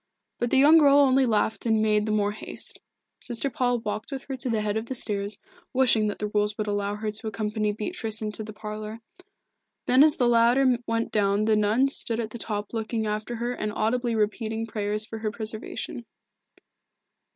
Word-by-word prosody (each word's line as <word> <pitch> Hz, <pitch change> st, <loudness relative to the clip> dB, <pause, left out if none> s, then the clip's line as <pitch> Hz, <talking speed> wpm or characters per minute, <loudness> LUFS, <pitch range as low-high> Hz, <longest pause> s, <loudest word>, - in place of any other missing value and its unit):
But 240 Hz, -, 0 dB
the -, -, +3 dB
young 300 Hz, +4 st, +7 dB
girl 285 Hz, -2 st, +6 dB
only 270 Hz, -2 st, +4 dB
laughed 220 Hz, +1 st, 0 dB
and 220 Hz, -1 st, +3 dB
made 215 Hz, 0 st, +2 dB
the -, -, 0 dB
more 205 Hz, -1 st, +1 dB
haste. 210 Hz, -, -5 dB, 0.4 s
Sister 250 Hz, +3 st, -2 dB
Paul 245 Hz, 0 st, +1 dB
walked 215 Hz, +3 st, -4 dB
with 270 Hz, -1 st, -5 dB
her 270 Hz, -1 st, -6 dB
to 255 Hz, 0 st, -3 dB
the 220 Hz, -2 st, 0 dB
head 210 Hz, 0 st, -1 dB
of 220 Hz, +1 st, -3 dB
the 260 Hz, -, -4 dB
stairs, 205 Hz, -3 st, -3 dB, 0.4 s
wishing 245 Hz, -5 st, +3 dB
that 205 Hz, -, -3 dB
the 210 Hz, -, -3 dB
rules 210 Hz, 0 st, 0 dB
would 215 Hz, -, -2 dB
allow 205 Hz, 0 st, -2 dB
her 215 Hz, 0 st, -3 dB
to 220 Hz, +1 st, -5 dB
accompany 215 Hz, 0 st, -1 dB
Beatrice 220 Hz, -, -1 dB
into 215 Hz, 0 st, -2 dB
the 215 Hz, -, -8 dB
parlour. 215 Hz, +1 st, -7 dB, 0.8 s
Then 255 Hz, +3 st, +6 dB
as 305 Hz, -1 st, +5 dB
the 245 Hz, -, +2 dB
latter 240 Hz, +2 st, +4 dB
went 230 Hz, 0 st, -1 dB
down 200 Hz, 0 st, +2 dB
the 220 Hz, 0 st, +3 dB
nun 215 Hz, +6 st, +3 dB
stood 230 Hz, -4 st, 0 dB
at 220 Hz, -2 st, -3 dB
the 235 Hz, -, -7 dB
top 210 Hz, -1 st, -4 dB
looking 225 Hz, 0 st, -2 dB
after 215 Hz, +3 st, -3 dB
her 240 Hz, +2 st, -2 dB
and 215 Hz, -3 st, -3 dB
audibly 235 Hz, +2 st, 0 dB
repeating 220 Hz, +1 st, -1 dB
prayers 210 Hz, -1 st, +1 dB
for 225 Hz, 0 st, -7 dB
her 215 Hz, -1 st, -2 dB
preservation. 220 Hz, +1 st, -5 dB
220 Hz, 195 wpm, -26 LUFS, 210-240 Hz, 0.8 s, young